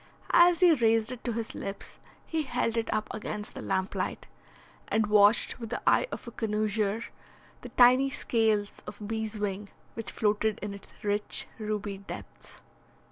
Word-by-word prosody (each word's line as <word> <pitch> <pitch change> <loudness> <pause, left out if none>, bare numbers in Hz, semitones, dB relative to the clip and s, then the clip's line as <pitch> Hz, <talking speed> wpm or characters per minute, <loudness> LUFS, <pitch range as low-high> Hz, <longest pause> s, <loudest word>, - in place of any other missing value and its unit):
As 345 +1 +6
he 355 -2 +7
raised 225 -4 +2
it 250 -1 -7
to 240 - -1
his 225 0 -4
lips, 195 0 -7 0.3
he 320 -1 -1
held 245 -4 -1
it 230 -1 -1
up 215 0 -1
against 210 -1 -5
the - - -7
lamplight, 190 0 -2 0.6
and 220 0 +2
watched 210 +3 +4
with 230 -2 -6
the 240 - -2
eye - - +4
of - - -7
a - - -6
connoisseur 215 -1 -1 0.6
the - - -8
tiny 255 +2 +5
scales 220 -5 0
of 210 -1 -7
beeswing 210 -2 -3 0.2
which 225 - -4
floated 215 0 +1
in 205 -1 -4
its 200 - -12
rich 205 0 0
ruby 210 -2 -3
depths. 200 - -10
215 Hz, 155 wpm, -29 LUFS, 205-230 Hz, 0.6 s, he